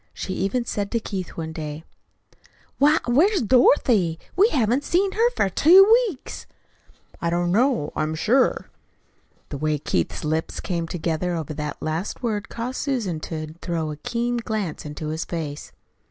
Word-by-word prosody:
She 190 - -4
even 200 +7 -1
said 205 -3 -2
to 230 - +2
Keith 195 -4 -6
one 160 -1 -4
day: 155 0 -6 1.0
"Why, 295 +3 +5
where's 335 - +3
Dorothy? 225 - +4 0.2
We 405 +5 +5
haven't 250 - +1
see 370 +6 +2
her 460 +2 +3
for - - +2
two 345 - +7 0.2
weeks." 280 -9 -9 0.7
"I 170 - 0
don't 175 +1 0
know, 235 - +1
I'm 155 +1 -1
sure." 245 - +1 0.8
The 140 - -6
way 155 0 0
Keith's 90 - -2
lips 160 +1 -2
came 170 -3 -3
together 175 +1 -2
over 155 -2 -4
the 150 0 -4
last 160 +10 -3
word 215 -4 -2
caused 245 +2 -4
Susan 230 - -2
to 155 -1 -6
throw 165 -3 -2
a - - -5
keen 240 +8 -2
glance 215 -10 -3
into 150 +1 -5
his 160 +1 -2
face. 155 -4 -5
185 Hz, 155 wpm, -23 LUFS, 160-245 Hz, 1.0 s, two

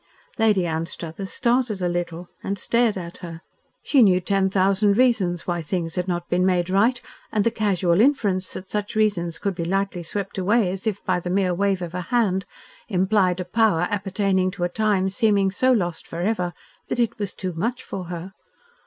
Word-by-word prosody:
Lady 210 -5 +3
Anstruthers 165 +3 -4
started 240 -4 +1
a 180 - 0
little, 175 0 -3 0.2
and 200 +1 -2
stared 230 +1 +2
at 170 -1 -7
her. 165 -2 -8 0.4
She 275 - +4
knew 190 -5 +5
ten 190 +1 +1
thousand 195 +2 +2
reasons 205 -9 +2
why 175 -1 -1
things 165 0 -2
had 180 0 -1
not 175 -1 -2
been 180 +1 +1
made 180 -1 +1
right, 225 +6 +3 0.3
and 210 -2 +1
the 230 - +2
casual 195 -5 +2
inference 205 -9 +2
that 190 - -7
such 210 0 -3
reasons 185 -6 +1
could 200 -2 -2
be 170 -1 -4
lightly 195 +1 -1
swept 195 +3 -4
away 200 +1 +2
as 190 +3 -5
if 205 -2 -2
by 185 -2 +1
the 175 - -5
mere 185 -1 +1
wave 195 0 0
of 170 -1 -6
a 180 - -3
hand, 195 -2 0 0.4
implied 190 -2 +2
a 180 - -3
power 215 -3 +2
appertaining 195 -1 0
to 185 -1 -5
a 175 - +1
time 205 -1 +1
seeming 200 -1 +2
so 255 +7 +2
lost 175 -8 0
forever 180 0 -2 0.3
that - - -2
it 235 -3 0
was 205 -3 -4
too 185 -2 -4
much 230 +10 -2
for 185 -2 -6
her. 175 +2 -7
190 Hz, 190 wpm, -23 LUFS, 175-210 Hz, 0.4 s, knew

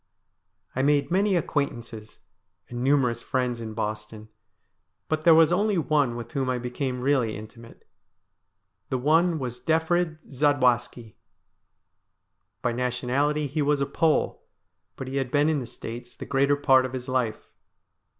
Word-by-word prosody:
I 130 - +1
made 145 +3 +2
many 195 +2 +2
acquaintances 120 -9 -3 0.5
and 120 0 -6
numerous 130 -4 +2
friends 125 -3 -2
in 110 -1 -6
Boston; 105 0 -5 0.8
but 155 0 -2
there 165 -2 +8
was 160 0 +5
only 205 +1 +1
one 145 -6 +1
with 120 -1 -7
whom 135 -2 -1
I 125 - 0
became 125 +1 -3
really 125 -5 +1
intimate. 115 +2 -13 1.0
The 130 - 0
one 160 +6 +3
was 125 -3 -5
Defrid 160 +3 +1
Zadwaski. 125 -5 +1 1.5
By - - +1
nationality 125 +5 0
he 145 +3 -2
was 145 0 +2
a 140 - +1
Pole, 155 +3 0 0.5
but 130 - -7
he 135 +1 -3
had 135 -2 -1
been 145 +3 +2
in 155 -2 +1
the 125 - -6
States 120 +2 -8
the - - -8
greater 140 +1 +2
part 135 -2 +4
of 130 0 -5
his 130 0 -5
life. 125 -4 -2
130 Hz, 145 wpm, -26 LUFS, 120-150 Hz, 1.5 s, there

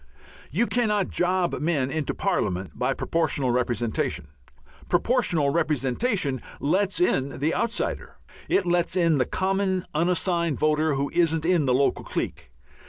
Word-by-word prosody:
You 195 - +1
cannot 210 -6 0
job 180 0 0
men 145 -5 0
into 155 -2 -2
Parliament 90 +1 -1
by - - -1
Proportional 145 -6 0
Representation. 120 - -1 0.6
Proportional 175 - +2
Representation 150 - 0 0.2
lets 190 +7 +1
in 140 -6 +1
the 150 +4 0
outsider. 235 0 -2 0.3
It 195 - +2
lets 175 -1 +1
in 165 -5 +3
the 130 - +2
common, 190 -1 0
unassigned 170 -1 +1
voter 155 0 +2
who 140 +1 -1
isn't 165 -2 +2
in 175 -4 +3
the 130 - +2
local 140 +1 +1
clique. - - -4
165 Hz, 130 wpm, -25 LUFS, 140-185 Hz, 0.6 s, in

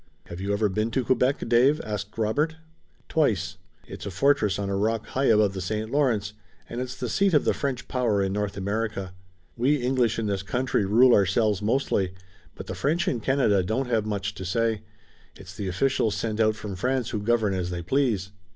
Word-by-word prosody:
"Have 85 +1 -7
you 100 +1 -2
ever 105 +1 +2
been 110 +3 -1
to 130 +3 0
Quebec, 130 +1 +1
Dave?" 125 +6 +4
asked 105 0 -5
Robert. 145 +9 0 0.5
"Twice. 140 - 0 0.3
It's - - -8
a - - -2
fortress 105 +1 +2
on 100 -1 -3
a 100 - -1
rock 110 +2 0
high 135 +1 -1
above 105 -4 +4
the 95 - -4
St. 110 +4 -3
Lawrence, 115 -8 +1 0.3
and 120 +2 -4
it's 125 0 -5
the 125 - -4
seat 195 - +2
of 150 - +3
the - - +3
French 135 -4 -3
power 120 -5 +1
in 95 -1 0
North 105 -1 -2
America. 100 -1 -3 0.4
We 130 +5 +2
English 125 -4 +1
in 115 - -1
this 100 -2 -1
country 125 +1 0
rule 120 +5 +5
our 100 -3 +4
selves 105 0 +1
mostly, 105 -5 0 0.4
but - - -8
the - - -5
French 165 +5 0
in 120 - 0
Canada 115 -5 +2
don't 125 +7 -2
have 110 -2 +1
much 100 0 -2
to 95 - -8
say. 110 +3 0 0.5
It's 95 -1 -12
the 100 0 -4
officials 110 +3 +1
sent 110 -1 -3
out 110 -1 +3
from 105 -2 -6
France 125 +4 -1
who 110 -3 -2
govern 110 -2 +1
as 90 -2 -2
they 85 -1 -4
please." 110 -4 0
110 Hz, 205 wpm, -26 LUFS, 100-125 Hz, 0.5 s, rule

